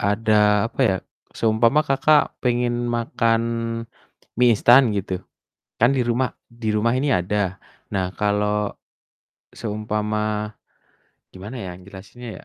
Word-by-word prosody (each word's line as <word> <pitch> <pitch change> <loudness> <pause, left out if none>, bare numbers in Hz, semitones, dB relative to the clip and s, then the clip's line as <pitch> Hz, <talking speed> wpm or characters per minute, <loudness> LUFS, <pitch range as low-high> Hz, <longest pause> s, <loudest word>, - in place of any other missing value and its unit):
ada, 105 0 +3
apa - - -7
ya, 110 -7 +3 0.4
seumpama 115 +7 +3
Kakak 150 +2 +2
pengen 120 -1 0
makan, 115 -1 +1 1.0
mie 125 -1 +6
instan 120 +2 +6
gitu. 95 -1 -3 0.6
Kan 120 +4 +4
di 130 - +1
rumah 125 +2 0 0.2
di 115 -2 -4
rumah 115 +3 +2
ini 140 +2 0
ada, 95 +1 -1 0.3
nah 95 -2 -1
kalau 105 0 0 0.8
seumpama, 105 0 -2 0.8
gimana 105 +7 -8
ya 95 -3 -6
jelasinnya 100 +3 -11
110 Hz, 110 wpm, -22 LUFS, 105-120 Hz, 1.0 s, mie